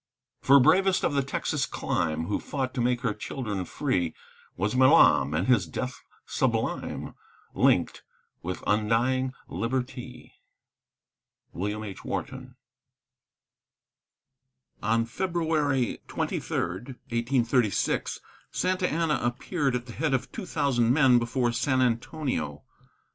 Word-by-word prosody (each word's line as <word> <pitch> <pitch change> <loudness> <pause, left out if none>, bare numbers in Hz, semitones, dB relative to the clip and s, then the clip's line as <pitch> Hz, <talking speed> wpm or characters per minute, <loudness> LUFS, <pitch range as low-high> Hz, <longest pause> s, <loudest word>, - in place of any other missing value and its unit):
For 140 +1 +7
bravest 185 +7 +4
of - - +1
the 140 - +2
Texan 135 - -2
clime, 80 +1 -1
Who 100 - -1
fought 130 -3 -3
to 125 - -1
make 125 +1 +1
her 120 -5 0
children 105 -3 -4
free, 90 - -1 0.4
Was 105 +6 -1
Milam, 80 - +5
and 85 +4 +1
his 105 -9 +3
death 125 +11 -5 0.2
sublime - - -1 0.4
Linked - - +2 0.4
with 90 +2 -5
undying 120 +5 +1
Liberty! 125 +4 -4 1.2
WILLIAM 105 +5 -3
H. 100 -3 -8
WHARTON. 130 -1 -5 2.3
On 115 +2 +2
February 155 - 0
23, - - -3
1836, 120 +3 -1 0.3
Santa 185 0 0
Anna 160 -3 +1
appeared 135 +3 -1
at 120 0 -3
the 120 - -9
head 145 0 0
of 130 +1 -3
two 215 -5 -6
thousand 120 -7 +1
men 130 -3 +5
before 120 +1 0
San 130 +3 +1
Antonio. 120 - -1
125 Hz, 110 wpm, -27 LUFS, 110-135 Hz, 2.3 s, For